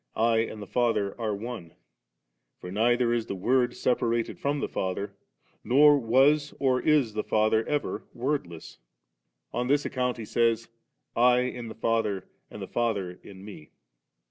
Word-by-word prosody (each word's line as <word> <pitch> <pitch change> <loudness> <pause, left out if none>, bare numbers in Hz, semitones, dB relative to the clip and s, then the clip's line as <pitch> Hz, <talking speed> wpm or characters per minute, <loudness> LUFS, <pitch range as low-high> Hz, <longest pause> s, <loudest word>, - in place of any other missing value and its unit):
<I 115 0 +2
and 110 -2 -3
the - - -8
Father 110 -4 0
are 110 -2 -1
One',*' 105 -6 -7 0.8
for 90 - -8
neither 120 +3 +2
is 115 -2 -1
the - - -4
Word 125 +6 +1
separated 120 -2 0
from 145 +1 -1
the - - -2
Father, 95 +2 -3 0.5
nor 145 +3 +6
was 135 +5 +3
or 130 -2 +2
is 145 -8 +2
the 105 0 -2
Fadier 110 +1 +2
ever 145 -1 -2
Wordless; 120 - -4 0.7
on 125 0 -1
this 145 +2 +2
account 125 -1 -1
He 115 - -6
says, 115 0 +1 0.3
' - - -52
I 125 +1 +4
in 125 -2 -4
the 110 - -8
Father 110 -4 -1 0.2
and - - -8
the - - -6
Father 100 -7 -2
in 95 0 -12
Mel' 100 -7 -10
3. - - -34
115 Hz, 165 wpm, -27 LUFS, 105-125 Hz, 0.8 s, nor